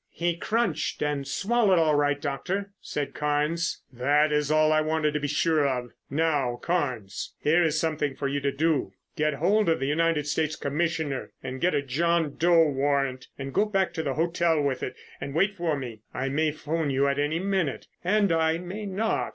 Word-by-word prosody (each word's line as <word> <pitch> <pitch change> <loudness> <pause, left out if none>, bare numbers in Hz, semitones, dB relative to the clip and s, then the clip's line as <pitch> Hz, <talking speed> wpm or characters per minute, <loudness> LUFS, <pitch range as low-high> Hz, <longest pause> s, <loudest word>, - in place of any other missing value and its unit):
"He 170 0 0
crunched 195 -6 -1
and 145 -2 -1
swallowed 210 -3 +2
all 160 -2 +3
right, 145 -1 +2
Doctor," 180 +8 -3
said 145 -1 -4
Carnes. 150 +3 -1
"That 145 +5 +2
is 150 -1 +1
all 155 0 +4
I 155 - +4
wanted 155 -1 0
to 150 - 0
be 145 - -2
sure 150 0 +2
of. 125 -2 -2 0.2
Now 145 -4 +1
Carnes, 125 - -3
here 160 +4 +3
is 160 -2 +2
something 150 -4 -1
for 140 - -2
you 140 +1 -1
to 140 0 0
do. 145 -8 0 0.2
Get 150 -1 +1
hold 190 +6 +2
of 165 - +2
the 135 - -1
United 155 +1 +1
States 155 +1 0
Commissioner 155 -2 -2
and 130 0 -5
get 180 +1 +2
a 140 - +1
John 160 +2 0
Doe 170 -1 +5
warrant 135 -2 0
and 135 -1 -6
go 210 - +3
back 195 -3 0
to 160 - -2
the 140 -4 -2
hotel 170 0 +1
with 140 -3 0
it - - -4 0.3
and 140 - -5
wait 195 +4 +2
for 170 -5 -1
me. 120 -5 -7
I 135 +1 -1
may 155 +3 +1
phone 155 0 -2
you 135 +1 +2
at 140 0 0
any 150 +3 0
minute 180 - -1 0.2
and 200 +1 +2
I 160 0 +2
may 190 +4 -6
not. 205 +4 -1
155 Hz, 195 wpm, -26 LUFS, 140-170 Hz, 0.3 s, Doe